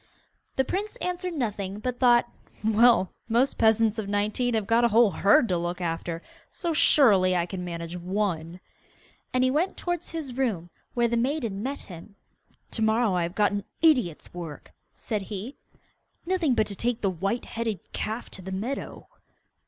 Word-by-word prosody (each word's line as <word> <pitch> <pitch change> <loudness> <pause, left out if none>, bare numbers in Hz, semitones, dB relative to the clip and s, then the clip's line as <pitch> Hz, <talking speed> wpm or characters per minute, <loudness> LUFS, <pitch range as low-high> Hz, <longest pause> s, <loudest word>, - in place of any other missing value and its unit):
The 265 - +2
prince 415 - -3
answered 360 -5 -3
nothing, 205 -7 -2
but 245 +3 -4
thought, 240 -2 +5 0.4
'Well, 220 -3 +4 0.2
most 245 +5 +2
peasants 220 0 +3
of 200 -2 -4
nineteen 215 +4 0
have 215 -2 0
got 230 +3 +3
a - - +6
whole 225 -1 +5
herd 200 +7 +4
to 180 -2 +1
look 175 +1 -3
after, 165 -1 -3 0.3
so 340 -2 -3
surely 200 -12 +5
I 170 -1 +1
can 180 0 -6
manage 170 -1 -5
one.' 180 -2 -2 0.7
And 255 0 +2
he 255 - +3
went 330 +7 0
towards 350 -1 -3
his 305 -7 -5
room, 205 -11 -1 0.2
where 240 -1 +3
the 235 0 0
maiden 235 -5 -1
met 275 +5 -3
him. 180 +3 -12 0.6
'To 225 - -3
morrow 220 -1 +3
I 180 - +1
have 170 +2 -3
got 205 0 +3
an 205 -1 -2 0.2
idiot's 250 - +2
work,' 170 -4 -8 0.2
said 215 -2 -4
he; 210 +6 -6 0.7
'nothing 340 -7 +1
but 215 - +3
to 200 - -4
take 240 +3 0
the 195 - +1
white 195 +7 -2
headed 225 -3 -3
calf 220 +3 -3
to 190 - -5
the 190 +1 -7
meadow. 225 +9 -4
220 Hz, 175 wpm, -26 LUFS, 185-250 Hz, 0.7 s, a